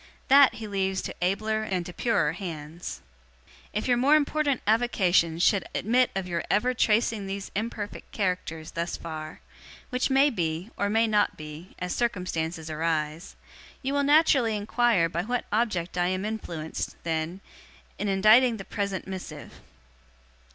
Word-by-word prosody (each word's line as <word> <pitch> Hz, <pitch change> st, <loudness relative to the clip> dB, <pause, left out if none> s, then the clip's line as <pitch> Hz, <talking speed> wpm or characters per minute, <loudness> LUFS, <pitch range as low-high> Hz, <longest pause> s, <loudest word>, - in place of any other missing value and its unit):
That 275 Hz, 0 st, +7 dB
he 225 Hz, -, -7 dB
leaves 190 Hz, -1 st, -1 dB
to -, -, -5 dB
abler 215 Hz, +4 st, 0 dB
and 185 Hz, -5 st, -2 dB
to 180 Hz, -, -8 dB
purer 230 Hz, -10 st, +1 dB
hands. 165 Hz, -2 st, -7 dB, 0.7 s
'If 210 Hz, +4 st, -2 dB
your 245 Hz, -1 st, +3 dB
more 275 Hz, +5 st, +5 dB
important 295 Hz, -2 st, +1 dB
avocations 190 Hz, -7 st, +2 dB
should 195 Hz, -2 st, +4 dB
admit 245 Hz, +5 st, +3 dB
of 190 Hz, -1 st, -2 dB
your 170 Hz, -1 st, -2 dB
ever 245 Hz, +6 st, +2 dB
tracing 220 Hz, -3 st, +1 dB
these 195 Hz, 0 st, -5 dB
imperfect 210 Hz, -1 st, -4 dB
characters 180 Hz, -5 st, -2 dB
thus 170 Hz, +1 st, -3 dB
far 155 Hz, -1 st, -7 dB, 0.5 s
which 250 Hz, +2 st, 0 dB
may 275 Hz, +2 st, +4 dB
be, 170 Hz, +1 st, -2 dB
or 200 Hz, -, 0 dB
may 225 Hz, +2 st, +3 dB
not 210 Hz, -2 st, +1 dB
be, 155 Hz, +4 st, -10 dB
as 180 Hz, 0 st, -3 dB
circumstances 170 Hz, -8 st, -2 dB
arise 155 Hz, +1 st, -2 dB, 0.5 s
you 270 Hz, +2 st, -1 dB
will 285 Hz, -, +2 dB
naturally 280 Hz, -6 st, +4 dB
inquire 215 Hz, -3 st, +2 dB
by 170 Hz, +1 st, -2 dB
what 245 Hz, +6 st, -2 dB
object 205 Hz, -6 st, 0 dB
am 185 Hz, +2 st, 0 dB
I -, -, 0 dB
influenced, 170 Hz, -8 st, -5 dB
then, 165 Hz, +2 st, -2 dB, 0.6 s
in 205 Hz, -, -1 dB
inditing 215 Hz, +5 st, +5 dB
the 195 Hz, -, -8 dB
present 200 Hz, -3 st, -3 dB
missive? 190 Hz, -1 st, -7 dB
195 Hz, 150 wpm, -27 LUFS, 170-230 Hz, 0.7 s, That